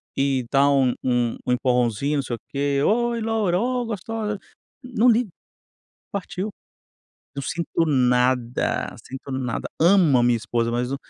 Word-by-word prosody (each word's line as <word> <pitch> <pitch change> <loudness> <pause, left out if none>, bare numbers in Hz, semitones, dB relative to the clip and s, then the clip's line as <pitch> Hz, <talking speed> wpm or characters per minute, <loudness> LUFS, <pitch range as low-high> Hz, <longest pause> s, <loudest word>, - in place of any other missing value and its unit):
e 135 -2 +1
dá 140 0 +4
um 135 -3 +3
um 120 -2 +1
um - - +2
empurrãozinho, 125 +2 +1
não 140 - 0
sei 120 - -3
o - - -13
quê. 140 0 0
"Oi 235 +1 +1
loura. 215 -5 +1
Oh, 250 +1 0
gostosa". 215 -1 -4 0.4
Não 250 -1 +2
ligo. 235 -1 +3 0.8
Partiu. 200 +1 -4 0.8
Não 140 - -4
sinto 170 +1 -1
nada, 125 -3 +1
sinto 135 +1 -8
nada. 130 -3 -3
Amo 170 -6 +5
a 120 - +3
minha 120 -1 +3
esposa, 115 +1 -1
mas 125 +2 -1
o - - -1
140 Hz, 150 wpm, -23 LUFS, 125-205 Hz, 0.8 s, Amo